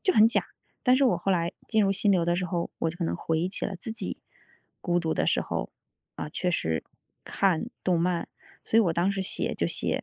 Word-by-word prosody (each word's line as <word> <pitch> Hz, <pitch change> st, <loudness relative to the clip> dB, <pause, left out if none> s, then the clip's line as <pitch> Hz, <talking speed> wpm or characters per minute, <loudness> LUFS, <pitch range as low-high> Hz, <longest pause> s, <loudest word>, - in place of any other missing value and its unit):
就 375 Hz, -4 st, +3 dB
很 215 Hz, -, +7 dB
假。 230 Hz, -, +1 dB, 0.4 s
但 250 Hz, 0 st, +5 dB
是 275 Hz, -, +4 dB
我 235 Hz, -9 st, +4 dB
后 180 Hz, +3 st, -1 dB
来 170 Hz, -2 st, +1 dB, 0.2 s
进 220 Hz, -1 st, +3 dB
入 195 Hz, -1 st, +3 dB
心 200 Hz, +1 st, +2 dB
流 180 Hz, -4 st, +3 dB
的 175 Hz, +1 st, +2 dB
时 180 Hz, +1 st, -1 dB
候， 175 Hz, -1 st, -2 dB
我 165 Hz, -, +1 dB
可 175 Hz, +1 st, -4 dB
能 -, -, -1 dB
回 160 Hz, -1 st, -1 dB
忆 175 Hz, +3 st, 0 dB
起 190 Hz, -, -3 dB
了 195 Hz, -, -3 dB
自 220 Hz, +5 st, -5 dB
己 225 Hz, -, -5 dB, 0.6 s
孤 175 Hz, -1 st, +1 dB
独 165 Hz, -2 st, -1 dB
的 -, -, +1 dB
时 -, -, +3 dB
候， -, -, -3 dB, 0.5 s
啊， -, -, -4 dB
确 180 Hz, +4 st, -1 dB
实 80 Hz, -, 0 dB, 0.4 s
看 190 Hz, 0 st, +1 dB, 0.2 s
动 180 Hz, -2 st, +3 dB
漫。 175 Hz, 0 st, 0 dB, 0.4 s
所 -, -, +1 dB
以 -, -, +8 dB
我 180 Hz, -7 st, +2 dB
当 175 Hz, +4 st, +2 dB
时 195 Hz, -, -2 dB
写 190 Hz, -, -1 dB
就 -, -, 0 dB
写 -, -, -1 dB
180 Hz, 255 characters per minute, -27 LUFS, 170-200 Hz, 0.6 s, 以